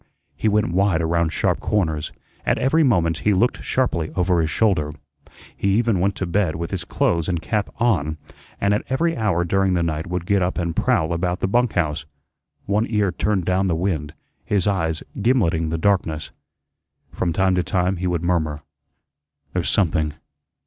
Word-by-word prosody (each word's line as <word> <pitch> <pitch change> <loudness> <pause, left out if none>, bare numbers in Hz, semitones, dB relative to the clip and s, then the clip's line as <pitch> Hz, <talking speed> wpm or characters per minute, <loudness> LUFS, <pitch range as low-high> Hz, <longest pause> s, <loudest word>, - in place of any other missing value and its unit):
He 80 - -1
went 105 -4 +2
wide 95 -2 +2
around 85 0 +1
sharp - - 0
corners. 80 -8 -1 0.3
At - - +1
every 145 +6 +2
moment 85 - +2
he 105 -1 +2
looked 120 +7 +1
sharply 85 -12 0
over 90 -1 +2
his 80 - 0
shoulder. 90 -6 +1 0.7
He 100 0 +1
even 115 -4 +2
went 100 +2 +1
to 95 - -3
bed 90 -1 0
with 85 +1 -4
his 95 -3 -3
clothes 85 0 0
and 85 -2 0
cap 105 +5 -1
on, 80 -10 +1 0.4
and 100 0 +2
at 105 - +1
every 165 +5 +1
hour 100 -6 +1
during 95 +1 +1
the 85 - +1
night 80 0 -2
would 90 0 -3
get 100 +1 +2
up 90 +1 -1
and 85 -2 -2
prowl 80 +2 +1
about 90 +1 -1
the - - 0
bunk 120 +3 +1
house, 80 -3 -1 0.6
one 105 +3 +1
ear 105 -4 +1
turned 100 -2 0
down 95 +2 +1
the 85 - +1
wind, 80 -4 -2 0.3
his 100 -4 0
eyes 80 -6 0 0.2
gimleting 90 -9 +2
the 80 - -1
darkness. 80 -4 0 0.8
From 85 - -1
time 95 +2 +2
to 90 - +2
time 90 +1 0
he 90 +1 -2
would 85 -1 -1
murmur: 80 -4 0 0.9
"There's 90 -2 0
something. 80 -6 +1
90 Hz, 180 wpm, -22 LUFS, 80-100 Hz, 0.9 s, went